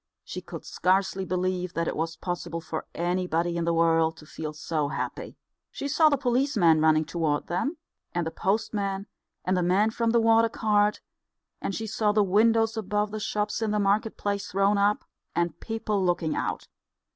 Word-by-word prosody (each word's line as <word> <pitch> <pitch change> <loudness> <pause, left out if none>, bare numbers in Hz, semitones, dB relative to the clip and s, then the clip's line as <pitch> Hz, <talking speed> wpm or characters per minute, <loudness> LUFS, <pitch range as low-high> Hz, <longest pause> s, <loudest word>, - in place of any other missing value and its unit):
She - - -6
could - - -9
scarcely 190 +1 +1
believe 185 0 -2
that 165 0 0
it - - -2
was 165 +1 -2
possible 175 -2 -4
for 160 -1 -5
anybody 175 -1 0
in 170 -1 -1
the 170 - +1
world 165 -1 +3
to 150 - -13
feel 155 0 -6
so 150 0 -2
happy. 145 - -5 0.3
She 280 - -5
saw 310 +2 +5
the 285 - +2
policeman 240 - +3
running 155 0 +4
toward 160 -3 -1
them, 230 - -2 0.3
and 175 -1 -1
the 160 - -3
postmen, 200 0 -1 0.4
and 185 - +2
the 180 - +1
man 190 +5 +3
from 230 0 0
the 235 +1 +4
water 225 0 +4
cart; 210 -2 +1 0.6
and 195 - -2
she 225 - -3
saw 215 -1 +1
the 210 0 +4
windows 225 +3 +3
above 210 -1 -1
the 215 - -4
shops 210 +1 -2
in 220 - 0
the 210 0 +1
market 205 +2 +1
place 200 -1 -2
thrown 195 +2 +2
up, 205 +1 +2 0.3
and 170 -1 -1
people 215 -3 -2
looking 175 -3 0
out. - - -3
195 Hz, 180 wpm, -27 LUFS, 170-215 Hz, 0.6 s, saw